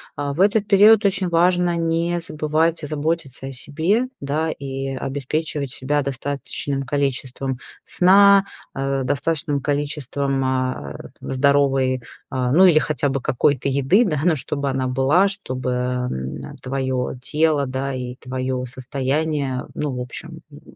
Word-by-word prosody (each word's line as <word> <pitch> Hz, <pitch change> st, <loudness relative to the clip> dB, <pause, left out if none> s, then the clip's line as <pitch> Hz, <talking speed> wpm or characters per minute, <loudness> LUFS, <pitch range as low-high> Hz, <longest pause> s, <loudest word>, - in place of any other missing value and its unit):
А, 145 Hz, 0 st, -2 dB
в 155 Hz, -, -8 dB
этот 205 Hz, +2 st, +3 dB
период 210 Hz, +2 st, +7 dB
очень 190 Hz, -1 st, +2 dB
важно 175 Hz, +1 st, +2 dB
не 170 Hz, +1 st, 0 dB
забывать 155 Hz, +1 st, 0 dB
заботиться 145 Hz, -3 st, -3 dB
о -, -, -5 dB
себе, 165 Hz, -, 0 dB
да, 155 Hz, +3 st, -1 dB
и 135 Hz, -1 st, -4 dB
обеспечивать 140 Hz, +1 st, -3 dB
себя 145 Hz, +3 st, 0 dB
достаточным 140 Hz, 0 st, -3 dB
количеством 135 Hz, -1 st, -2 dB, 0.2 s
сна, 200 Hz, +2 st, +5 dB, 0.3 s
а, 135 Hz, 0 st, -1 dB
достаточным 145 Hz, +2 st, -1 dB
количеством, 140 Hz, -1 st, -1 dB
а, 130 Hz, -, -1 dB
это -, -, -11 dB, 0.2 s
здоровой, 135 Hz, -2 st, +2 dB, 0.3 s
а, 125 Hz, -1 st, -1 dB
ну, 180 Hz, +7 st, +6 dB
или 175 Hz, -4 st, +6 dB
хотя 145 Hz, -2 st, +1 dB
бы 135 Hz, 0 st, -1 dB
какой-то 130 Hz, +2 st, +1 dB
еды, 140 Hz, -, +3 dB
да, 150 Hz, -6 st, -1 dB
но 170 Hz, -3 st, +4 dB
чтобы 140 Hz, 0 st, -2 dB
она 130 Hz, -1 st, -1 dB
была, 135 Hz, +9 st, +3 dB
чтобы, 130 Hz, -11 st, -4 dB
эм, 125 Hz, -, -2 dB, 0.2 s
а, -, -, -12 dB
твое 130 Hz, -1 st, -2 dB
тело, 150 Hz, 0 st, +1 dB
да, 130 Hz, +1 st, -3 dB
и 125 Hz, -1 st, -5 dB
твое 130 Hz, 0 st, -3 dB
состояние, 135 Hz, +1 st, -2 dB
ну, 150 Hz, -2 st, -2 dB
в -, -, -4 dB
общем, 125 Hz, -1 st, -7 dB
м, -, -, -13 dB
140 Hz, 140 wpm, -21 LUFS, 130-160 Hz, 0.3 s, период